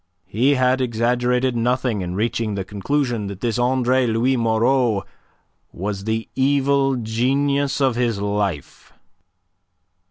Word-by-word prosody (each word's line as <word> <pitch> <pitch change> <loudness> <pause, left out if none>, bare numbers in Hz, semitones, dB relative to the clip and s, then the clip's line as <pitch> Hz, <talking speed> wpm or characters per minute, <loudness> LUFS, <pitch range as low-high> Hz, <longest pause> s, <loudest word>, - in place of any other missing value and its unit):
He 130 +7 +2
had 130 0 +2
exaggerated 125 +1 0
nothing 120 -2 0
in 90 0 -4
reaching 110 0 -1
the 95 -1 -3
conclusion 115 +2 -2
that 100 -2 -7
this 120 0 -1
Andre 130 0 +2
Louis 115 +4 +1
Moreau 115 -1 +1 0.7
was 100 +2 -5
the 110 0 -2
evil 135 0 +2
genius 135 +5 0
of 135 -4 +2
his 120 -4 0
life. 100 -6 -3
120 Hz, 120 wpm, -21 LUFS, 110-130 Hz, 0.7 s, He